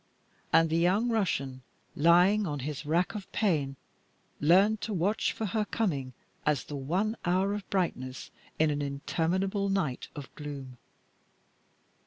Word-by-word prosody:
And 165 0 +4
the 165 - +2
young 195 +8 +3
Russian, 140 - -1 0.3
lying 180 +6 +5
on 145 -3 -3
his 145 +2 -5
rack 170 +4 +1
of 205 -3 -7
pain, 150 -10 +1 0.6
learned 195 +8 +4
to 220 - -3
watch 190 +5 +1
for 220 - -4
her 215 +2 0
coming 150 - -2 0.3
as 150 -3 +1
the 145 - -7
one 180 +11 -1
hour 185 +3 +2
of 205 -2 -6
brightness 130 -9 -2 0.3
in 155 -1 +3
an 145 0 -1
interminable 180 +8 -1
night 175 -10 -1
of 145 -3 -8
gloom. 135 -4 -8
170 Hz, 140 wpm, -29 LUFS, 145-200 Hz, 0.6 s, lying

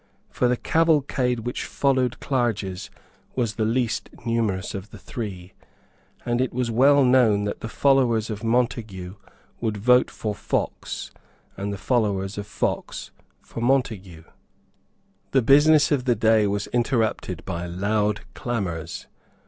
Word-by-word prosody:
For 125 - +1
the 125 0 +1
cavalcade 140 -7 +1
which 120 +2 -4
followed 130 -3 0
Clarges 110 -8 -2 0.5
was 120 -4 0
the 110 - -1
least 115 +1 -1 0.2
numerous 110 -5 -1
of 100 +1 -6
the - - -11
three; 95 -7 -7 0.7
and 120 +1 +1
it 130 - 0
was 125 -1 -1
well 140 +4 +5
known 120 -5 +4
that 105 - -3
the 115 - -6
followers 120 -5 +2
of 105 +1 -6
Montague 115 -6 -1 0.5
would 110 -3 -2
vote 125 +4 +4
for 105 -1 -4
Fox, - - -3 0.4
and 100 +1 -4
the 100 - -4
followers 105 -4 0
of 105 - -6
Fox - - -3 0.3
for 115 - -8
Montague. 110 -10 0 1.1
The 135 -2 +4
business 150 +4 +5
of 135 -4 +1
the 120 -2 +3
day 110 -1 +3
was 100 +1 -1
interrupted 115 - 0
by 90 -2 -4
loud 105 +3 0
clamours. 90 -9 -4
115 Hz, 135 wpm, -24 LUFS, 100-125 Hz, 1.1 s, well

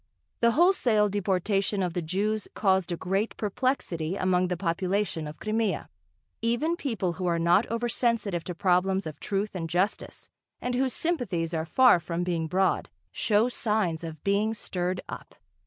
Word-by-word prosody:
The 235 -1 +4
wholesale 250 - +3
deportation 195 0 0
of 175 -2 -2
the 175 - -1
Jews 205 +6 -1
caused 190 -3 +2
a 170 - -2
great 195 +5 -1
perplexity 205 - -1
among 185 -1 +1
the 180 -1 -2
population 180 -1 -1
of 150 - -9
Crimea. 215 -1 -1 0.5
Even 240 +9 +1
people 225 - -2
who 180 +1 -3
are 170 -1 +2
not 175 +6 +3
over 230 +2 -1
sensitive 230 -7 0
to 180 - -5
problems 190 +2 +2
of 155 -2 -7
truth 200 +1 -2
and 165 -3 -4
justice 185 +5 -2 0.3
and 250 - -2
whose 260 0 +1
sympathies 195 - -1
are 160 -1 -1
far 255 +1 +5
from 170 +1 -3
being 170 -2 -1
broad, 185 +3 +1 0.2
show 210 - +2
signs 210 -9 0
of 160 -2 -7
being 205 +3 +1
stirred 180 -3 -3
up. - - -9
195 Hz, 160 wpm, -27 LUFS, 175-220 Hz, 0.5 s, far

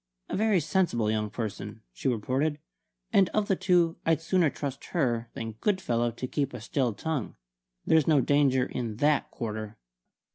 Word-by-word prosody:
"A - - -2
very 215 -2 +3
sensible 155 - +1
young 105 -1 -1
person," 110 -1 -5
she - - -4
reported; 130 +6 0 0.6
"and 195 -3 +5
of 215 -1 +2
the 195 - +2
two 175 -3 +2
I'd 165 -2 +2
sooner 165 0 +2
trust 140 -1 -5
her 120 -8 0
than 115 0 -4
Goodfellow 120 - +1
to 120 +2 -5
keep 140 -1 -2
a - - -5
still 120 +1 -1
tongue. 145 +2 -3 0.5
There's 160 -3 +4
no 155 -3 +5
danger 135 -1 +3
in 115 -5 -4
that 145 +5 +2
quarter!" 110 -2 -5
135 Hz, 160 wpm, -28 LUFS, 115-165 Hz, 0.6 s, and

